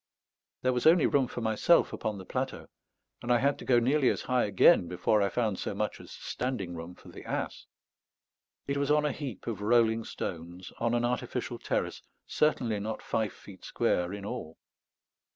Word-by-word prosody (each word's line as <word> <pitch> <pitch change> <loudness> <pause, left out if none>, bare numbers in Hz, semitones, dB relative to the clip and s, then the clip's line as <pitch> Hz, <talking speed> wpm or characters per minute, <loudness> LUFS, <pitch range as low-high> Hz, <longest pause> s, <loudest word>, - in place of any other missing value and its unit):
There 130 0 +3
was 125 +4 +2
only 165 -1 +6
room 135 -3 +3
for 120 - -6
myself 110 +9 +3
upon 105 -1 -3
the 95 - -9
plateau, - - -4 0.5
and 120 - -2
I 120 - +6
had 140 +3 +1
to - - -8
go 125 - +4
nearly 130 +3 +3
as - - -1
high 125 -1 +1
again 95 -3 +5
before 90 +4 +1
I 100 - +2
found 110 -5 -1
so - - -3
much - - -2
as - - -13
standing 120 -9 -4
room 85 +1 -8
for - - -15
the - - -11
ass. - - -4 1.0
It 140 0 -1
was 140 0 0
on 150 0 +3
a 150 - +1
heap 130 -9 -6
of 115 -3 -4
rolling 115 +1 +3
stones, 85 -2 -6
on 115 0 +1
an 120 0 +1
artificial 125 +1 -3
terrace, - - -2 0.2
certainly 120 -8 +1
not 110 +2 -4
five 110 -3 -1
feet 95 -3 -14
square 90 0 0
in 100 0 -6
all. 105 -9 -6
115 Hz, 190 wpm, -29 LUFS, 100-130 Hz, 1.0 s, only